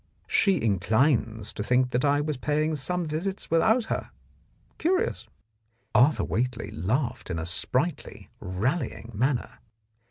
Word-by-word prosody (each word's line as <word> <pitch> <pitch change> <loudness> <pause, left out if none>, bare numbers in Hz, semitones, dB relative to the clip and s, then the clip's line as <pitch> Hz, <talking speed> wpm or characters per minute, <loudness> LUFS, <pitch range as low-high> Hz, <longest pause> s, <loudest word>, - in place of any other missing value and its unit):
She 195 -3 +3
inclines 110 - +1
to - - -5
think 125 +2 +2
that 125 +1 0
I 145 0 +3
was 150 0 -2
paying 150 +4 0
some 175 +5 -2
visits 170 +6 -3
without 220 +8 +4
her. - - -3 0.7
Curious! 370 +7 0 0.3
" - - -46 0.3
Arthur 140 +5 +4
Whately 120 0 -2
laughed 115 - -2
in 85 - -2
a 80 - -3
sprightly, 85 0 -2
rallying 115 - -2
manner. 125 +4 -1
130 Hz, 130 wpm, -27 LUFS, 110-155 Hz, 0.7 s, without